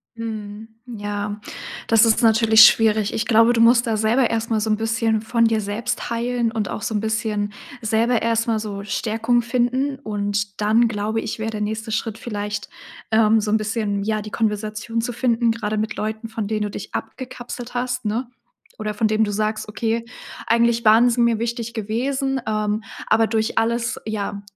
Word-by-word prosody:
Mhm, 220 Hz, -1 st, -6 dB, 0.2 s
ja, 205 Hz, -3 st, -4 dB, 0.5 s
das 225 Hz, 0 st, +5 dB
ist 225 Hz, +1 st, +3 dB
natürlich 225 Hz, 0 st, +7 dB
schwierig. 215 Hz, -2 st, +3 dB
Ich 225 Hz, -, -1 dB
glaube, 230 Hz, +1 st, +5 dB
du 230 Hz, -, +2 dB
musst 235 Hz, +1 st, +5 dB
da 225 Hz, -, +1 dB
selber 225 Hz, +4 st, +2 dB
erstmal 225 Hz, -1 st, 0 dB
so 220 Hz, -, -1 dB
'n 215 Hz, -, +3 dB
bisschen 225 Hz, 0 st, 0 dB
von 230 Hz, +1 st, +2 dB
dir 225 Hz, -1 st, +2 dB
selbst 225 Hz, +5 st, -3 dB
heilen 235 Hz, 0 st, -1 dB
und 220 Hz, -3 st, -2 dB
auch -, -, -5 dB
so 220 Hz, -, -2 dB
'n 210 Hz, -, +2 dB
bisschen 215 Hz, -1 st, -2 dB, 0.3 s
selber 225 Hz, +2 st, +1 dB
erstmal 230 Hz, -1 st, +1 dB
so 205 Hz, -2 st, -5 dB
Stärkung 225 Hz, +3 st, 0 dB
finden. 250 Hz, +3 st, 0 dB
Und 205 Hz, -3 st, -3 dB
dann, 225 Hz, +3 st, +4 dB
glaube 220 Hz, +1 st, -2 dB
ich, 225 Hz, -, -5 dB
wäre 220 Hz, +1 st, -2 dB
der 210 Hz, -1 st, -5 dB
nächste 220 Hz, +2 st, -3 dB
Schritt 220 Hz, 0 st, -2 dB
vielleicht, 210 Hz, -3 st, -5 dB, 0.4 s
ähm, 220 Hz, 0 st, +4 dB
so 210 Hz, 0 st, -2 dB
'n 220 Hz, -, +4 dB
bisschen, 210 Hz, -2 st, -2 dB
ja, 215 Hz, 0 st, -1 dB
die 210 Hz, 0 st, -8 dB
Konversation 215 Hz, +1 st, -2 dB
zu 245 Hz, +1 st, -3 dB
finden, 235 Hz, -1 st, +1 dB
gerade 215 Hz, -1 st, -2 dB
mit 215 Hz, +1 st, -2 dB
Leuten, 220 Hz, +1 st, -4 dB
von 225 Hz, -2 st, -4 dB
denen 215 Hz, 0 st, -1 dB
du 205 Hz, -, -3 dB
dich -, -, -8 dB
abgekapselt 245 Hz, -2 st, -6 dB
hast, 245 Hz, -1 st, -2 dB
ne? 235 Hz, +4 st, -2 dB, 0.5 s
Oder 215 Hz, -1 st, -3 dB
von 220 Hz, +1 st, +1 dB
denen 215 Hz, +1 st, +2 dB
du 205 Hz, -, -3 dB
sagst: 215 Hz, +1 st, -2 dB
„Okay, 230 Hz, +1 st, -2 dB, 0.4 s
eigentlich 235 Hz, 0 st, +3 dB
waren 225 Hz, +3 st, +6 dB
sie 240 Hz, 0 st, +1 dB
mir 235 Hz, -2 st, +3 dB
wichtig 235 Hz, 0 st, -3 dB
gewesen: 260 Hz, +5 st, -1 dB
Ähm, 215 Hz, 0 st, -1 dB, 0.2 s
aber 225 Hz, 0 st, +3 dB
durch 220 Hz, 0 st, -1 dB
alles, 235 Hz, +1 st, 0 dB
ja, 205 Hz, -2 st, -3 dB
220 Hz, 185 wpm, -22 LUFS, 215-235 Hz, 0.5 s, natürlich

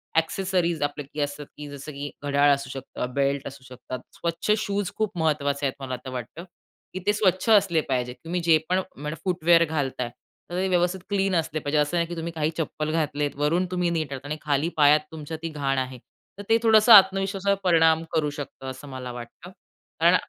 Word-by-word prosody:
Accessories 175 Hz, 0 st, 0 dB
आपल्याकडे 145 Hz, 0 st, -4 dB
असतात 145 Hz, 0 st, -5 dB
की 150 Hz, 0 st, -7 dB
जसं, 140 Hz, +1 st, -8 dB
की 145 Hz, +1 st, -5 dB
घड्याळ 145 Hz, 0 st, +3 dB
असू 140 Hz, -1 st, -3 dB
शकतं, 130 Hz, -2 st, -6 dB
बेल्ट 140 Hz, 0 st, 0 dB
असू 135 Hz, -1 st, -10 dB
शकतात, 130 Hz, 0 st, -8 dB
स्वच्छ 170 Hz, +5 st, -2 dB
शूज 200 Hz, -2 st, -2 dB
खूप 215 Hz, -4 st, -1 dB
महत्वाचे 145 Hz, -3 st, 0 dB
आहेत 135 Hz, -, -1 dB
मला 130 Hz, -1 st, -3 dB
तर 130 Hz, -, -5 dB
वाटतं, 130 Hz, +7 st, -6 dB, 0.5 s
की 185 Hz, -, -4 dB
ते 205 Hz, -, +4 dB
स्वच्छ 200 Hz, 0 st, +1 dB
असले 195 Hz, -7 st, +5 dB
पाहिजे. 125 Hz, -2 st, -1 dB
तुम्ही 175 Hz, +2 st, -2 dB
जे 160 Hz, -1 st, +7 dB
पण 185 Hz, +1 st, +2 dB
म्हणजे 150 Hz, +3 st, -6 dB
फूटवेअर 170 Hz, -2 st, +4 dB
घालताय 135 Hz, -5 st, -2 dB, 0.4 s
तर -, -, -3 dB
ते 190 Hz, -, +1 dB
व्यवस्थित 180 Hz, +1 st, +1 dB
क्लीन 195 Hz, -2 st, +1 dB
असले 160 Hz, -2 st, -1 dB
पाहिजे. 145 Hz, +1 st, -1 dB
असं 150 Hz, +4 st, +1 dB
नाही 170 Hz, -1 st, +1 dB
की 175 Hz, -, -6 dB
तुम्ही 165 Hz, +1 st, -4 dB
काही 155 Hz, 0 st, 0 dB
चप्पल 155 Hz, -1 st, -2 dB
घातलेत. 150 Hz, -2 st, -1 dB
वरून 155 Hz, +6 st, +1 dB
तुम्ही 180 Hz, -1 st, 0 dB
नीट 160 Hz, -4 st, -2 dB
आहात 135 Hz, +1 st, -7 dB
आणि 150 Hz, +2 st, -3 dB
खाली 150 Hz, +2 st, 0 dB
पायात 150 Hz, 0 st, +6 dB
तुमच्या 160 Hz, 0 st, -6 dB
ती 165 Hz, -, -2 dB
घाण 140 Hz, -3 st, -1 dB
आहे. 130 Hz, 0 st, -2 dB, 0.4 s
तर 205 Hz, -, -7 dB
ते 225 Hz, -, +6 dB
थोडंसं 220 Hz, 0 st, +7 dB
आत्मविश्वासावर 195 Hz, 0 st, +5 dB
परिणाम 165 Hz, -2 st, +4 dB
करू 150 Hz, -2 st, +1 dB
शकतं, 145 Hz, -2 st, -8 dB
असं 130 Hz, +2 st, -11 dB
मला 130 Hz, -1 st, -6 dB
वाटतं. 120 Hz, +9 st, -10 dB, 0.5 s
कारण -, -, +6 dB
155 Hz, 195 wpm, -25 LUFS, 140-180 Hz, 0.5 s, जे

